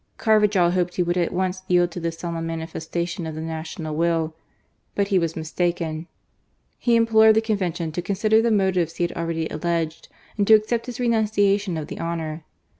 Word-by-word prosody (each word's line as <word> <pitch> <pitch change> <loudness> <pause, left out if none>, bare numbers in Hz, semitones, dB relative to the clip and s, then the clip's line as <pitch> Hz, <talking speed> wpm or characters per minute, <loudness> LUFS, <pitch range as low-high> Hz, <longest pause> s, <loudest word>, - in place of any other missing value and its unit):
Carvajd 210 -5 +3
hoped 180 -1 0
he 180 - +2
would 175 0 -1
at 175 -2 +1
once 185 +1 -1
yield 175 -1 +3
to 175 - -6
this 165 -1 -3
solemn 165 -1 -4
manifestation 165 +1 -4
of 160 - -6
the 155 - -5
national 160 -1 -5
will. 165 -1 +1 0.6
But 200 -1 0
he 195 -3 +3
was 165 -2 -2
mistaken. 165 0 -2 0.7
He 240 -1 +3
implored 220 -1 +5
the 220 - +4
Convention 185 -7 -2
to 175 - -3
consider 215 +4 +2
the 235 - +2
motives 190 -6 +1
he - - -1
had 170 - 0
already 165 -1 -2
alleged, 165 0 -2 0.3
and 200 - +2
to 220 - +9
accept 230 +2 0
his 245 -1 -6
renunciation 205 -5 +1
of 155 - -4
the - - -8
honour. 165 -1 -4
175 Hz, 185 wpm, -23 LUFS, 165-205 Hz, 0.7 s, to